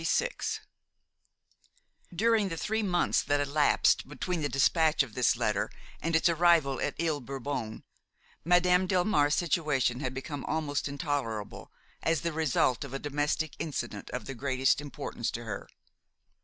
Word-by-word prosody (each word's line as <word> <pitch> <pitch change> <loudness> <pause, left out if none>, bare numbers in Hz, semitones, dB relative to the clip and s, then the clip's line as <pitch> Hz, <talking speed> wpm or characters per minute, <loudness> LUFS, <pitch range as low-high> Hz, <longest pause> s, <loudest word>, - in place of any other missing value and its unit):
XXVI - - -1 1.5
During 215 +2 +2
the 165 - -4
three 220 +6 -1
months 180 -4 +2
that 145 0 +1
elapsed 145 -1 +2
between 170 +3 -3
the 145 - 0
despatch 155 +2 +3
of 120 -5 -10
this 125 +1 +3
letter - - 0 0.3
and 165 +1 0
its 160 - +4
arrival 165 -5 +3
at - - -1
Ile 160 -3 0
Bourbon, 130 -3 -5 0.6
Madame 180 +2 +4
Delmare's 175 -6 +2
situation 150 -8 +1
had 130 -2 -3
become 135 +1 -5
almost 150 -3 -1
intolerable, 140 - -4 0.3
as 165 -3 +1
the 170 -1 -2
result 145 -5 +1
of 135 -1 -7
a - - 0
domestic 145 +2 -1
incident 120 -9 -4
of 125 +2 -5
the 135 - -5
greatest 130 +1 +1
importance 140 -4 -4
to 120 - -5
her. 110 -3 -6
145 Hz, 140 wpm, -29 LUFS, 135-170 Hz, 1.5 s, its